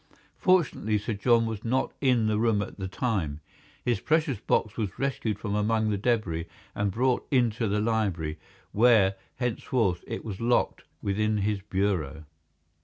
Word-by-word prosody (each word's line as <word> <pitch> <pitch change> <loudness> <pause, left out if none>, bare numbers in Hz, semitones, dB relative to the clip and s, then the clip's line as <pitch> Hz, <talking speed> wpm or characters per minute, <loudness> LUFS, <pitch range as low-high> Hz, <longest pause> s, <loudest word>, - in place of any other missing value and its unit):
Fortunately 165 - +2
Sir 105 +2 -3
John 115 +2 +3
was 110 -2 -4
not 130 +3 0
in 125 -5 +3
the 105 -1 +1
room 110 -3 +2
at - - -10
the 95 - -3
time. 95 - -2 0.5
His 120 -5 +1
precious 155 - +1
box 105 0 0
was 105 -6 -3
rescued 125 -6 -1
from 105 -1 -4
amongst 110 +1 +1
the 100 - 0
debris 100 -8 0 0.3
and 105 0 0
brought 125 +5 0
into 120 -3 +2
the 105 +1 +1
library, 100 -9 -1 0.3
where, 110 -4 +5 0.2
henceforward, 115 -6 0
it - - -5
was 105 -2 -6
locked 120 +1 +1 0.2
within 105 +2 +1
his 105 -2 0
bureau. 90 -7 -1
110 Hz, 155 wpm, -27 LUFS, 100-120 Hz, 0.5 s, where